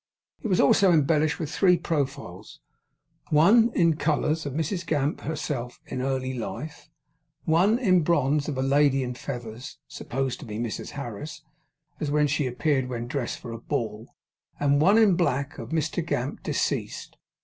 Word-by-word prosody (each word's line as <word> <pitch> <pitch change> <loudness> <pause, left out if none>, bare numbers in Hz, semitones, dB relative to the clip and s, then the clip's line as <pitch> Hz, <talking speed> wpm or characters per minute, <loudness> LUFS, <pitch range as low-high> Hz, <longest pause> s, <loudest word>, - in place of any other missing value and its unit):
It - - -3
was 185 -4 +1
also 185 +7 +5
embellished 155 0 +2
with 160 -3 -4
three 180 -3 +4
profiles: 135 - -4 0.7
one, 215 +10 +5
in 165 -3 +3
colours, 155 0 0
of 140 - -5
Mrs 160 +5 -2
Gamp 150 -3 -1
herself 140 -5 -4
in 130 - -4
early 130 0 -1
life; 130 +5 -6 0.5
one, 180 +8 +3
in 185 -8 +3
bronze, 150 -2 +1
of 140 - -3
a 130 - 0
lady 135 0 +3
in 125 0 -3
feathers, 120 0 -7
supposed 135 0 -3
to - - -9
be 105 -1 -5
Mrs 115 -1 -4
Harris, 140 +3 -7 0.6
as 150 -1 +1
she 145 -2 0
appeared 130 0 0
when 120 -1 -4
dressed 125 -1 -3
for 120 - -9
a 115 - -6
ball; 115 -5 -4 0.4
and 145 0 +3
one, 195 +7 +5
in 215 -5 +5
black, 140 -6 -1
of - - -7
Mr 160 +1 -1
Gamp, 140 -4 -3
deceased. - - -2
145 Hz, 160 wpm, -26 LUFS, 130-160 Hz, 0.7 s, also